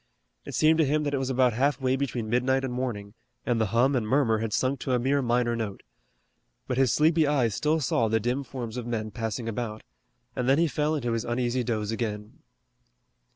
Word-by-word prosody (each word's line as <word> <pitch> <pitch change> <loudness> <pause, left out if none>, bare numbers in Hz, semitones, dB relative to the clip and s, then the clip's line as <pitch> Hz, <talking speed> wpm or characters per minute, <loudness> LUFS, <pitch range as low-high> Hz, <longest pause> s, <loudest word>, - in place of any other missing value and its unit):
It - - -6
seemed 160 +1 +4
to - - +6
him 150 +1 +1
that 145 -1 -2
it 140 - +1
was 135 0 -2
about 130 -2 +3
half 140 +5 +1
way 130 -1 +1
between 130 -4 -3
midnight 130 +3 +1
and 130 -2 -3
morning, 110 -5 -4 0.3
and 120 -2 +1
the 110 - +2
hum 125 +7 +2
and 115 -4 0
murmur 115 -3 +2
had 110 -1 -3
sunk 130 +5 0
to 130 - -2
a 125 - +2
mere 135 +3 +1
minor 120 -1 +1
note. 110 -4 -5 0.8
But 125 0 -1
his 130 -4 +4
sleepy 160 0 +3
eyes 130 -7 +2
still 155 +8 +1
saw 120 -4 +1
the 110 +1 +1
dim 125 +5 -1
forms 125 -3 -6
of 120 -1 -5
men 110 -2 -3
passing 115 0 -4
about, 110 -1 -4 0.5
and 125 0 -1
then 135 - +5
he 170 - +4
fell 150 +1 0
into 120 -5 -2
his 115 -1 -1
uneasy 120 +1 -1
doze 110 -2 -2
again. 105 -2 -4
125 Hz, 215 wpm, -27 LUFS, 115-135 Hz, 0.8 s, to